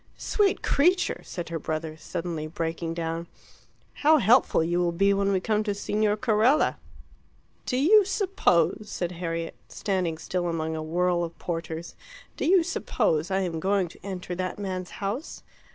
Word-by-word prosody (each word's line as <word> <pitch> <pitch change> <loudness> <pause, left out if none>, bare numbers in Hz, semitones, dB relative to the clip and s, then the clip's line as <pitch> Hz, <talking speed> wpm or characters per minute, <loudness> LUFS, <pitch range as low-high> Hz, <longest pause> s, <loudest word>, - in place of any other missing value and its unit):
"Sweet 405 -3 +1
creature!" 360 +6 +2
said 175 -3 -6
her 165 -1 -3
brother, 155 0 -3
suddenly 165 -1 -4
breaking 165 +1 -3
down. 165 0 -3 0.7
"How 310 +2 +6
helpful 235 - +4
you 175 +2 0
will 175 -1 +2
be 195 +4 +3
when 200 0 +1
we 190 - +2
come 215 +2 0
to 205 -2 -1
Signor 210 +1 0
Carella!" 235 +5 +3 0.9
"Do 250 - 0
you 400 +11 +6
suppose," 370 - +1
said 175 -3 -3
Harriet, 165 -1 -4
standing 185 -5 -2
still 175 +2 -2
among 160 -1 -2
a 160 - -3
whirl 175 +2 +1
of 165 0 -6
porters 165 -1 -5 0.4
"do - - -2
you 365 0 +5
suppose 160 - 0
I 190 0 +1
am 170 -3 -2
going 190 0 +1
to - - -17
enter 185 -2 -5
that 185 +1 -3
man's 185 -3 -4 0.2
house?" 235 +11 -4
180 Hz, 160 wpm, -26 LUFS, 165-210 Hz, 0.9 s, How